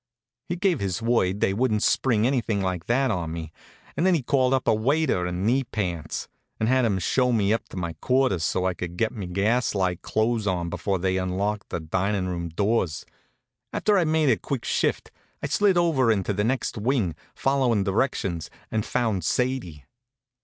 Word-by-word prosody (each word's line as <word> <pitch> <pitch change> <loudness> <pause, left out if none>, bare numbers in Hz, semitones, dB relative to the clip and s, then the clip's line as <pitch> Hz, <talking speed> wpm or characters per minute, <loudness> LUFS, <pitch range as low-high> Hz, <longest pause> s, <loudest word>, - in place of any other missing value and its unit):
He 175 - -1
gave 180 -4 +1
his 95 -3 -2
word 115 -4 +1
they 95 - +2
wouldn't 110 -1 +1
spring 115 -5 +2
anything 120 -5 +1
like 95 -2 -2
that 130 +1 +2
on 85 -5 -2
me, 80 -1 -6 0.4
and - - 0
then 185 -1 +4
he 150 - -1
called 130 0 +2
up 130 -1 +1
a - - +5
waiter 115 - +1
in 90 +2 -2
knee 130 +4 +3
pants, 90 - -4 0.3
and 110 - +1
had 130 0 +3
him 100 -4 +1
show 125 +8 +1
me 105 -3 +2
up 115 - -3
to - - -9
my 85 -2 -3
quarters 125 -10 +2
so 90 +3 0
I 95 - +1
could 90 0 -6
get 115 +2 +1
me 100 -6 -6
gas 105 +7 +1
light 90 -3 0
clothes 110 -1 0
on 85 -3 -1
before 100 -2 -1
they 95 +1 0
unlocked 100 +3 -2
the - - -3
dinin' 95 +4 -1
room 85 -2 -3
doors. 95 -3 0 0.7
After 210 - +2
I'd 180 -5 +3
made 155 -2 +3
a 110 - +3
quick 135 -4 -4
shift - - 0 0.3
I - - 0
slid 185 +6 +3
over 150 -9 +3
into 105 -1 0
the 105 +1 0
next 120 -1 -1
wing, 110 - +1 0.2
followin' 130 -6 +2
directions, 95 - -1 0.2
and 110 -1 0
found 110 -8 -1
Sadie. 105 - -1
105 Hz, 190 wpm, -25 LUFS, 95-130 Hz, 0.7 s, a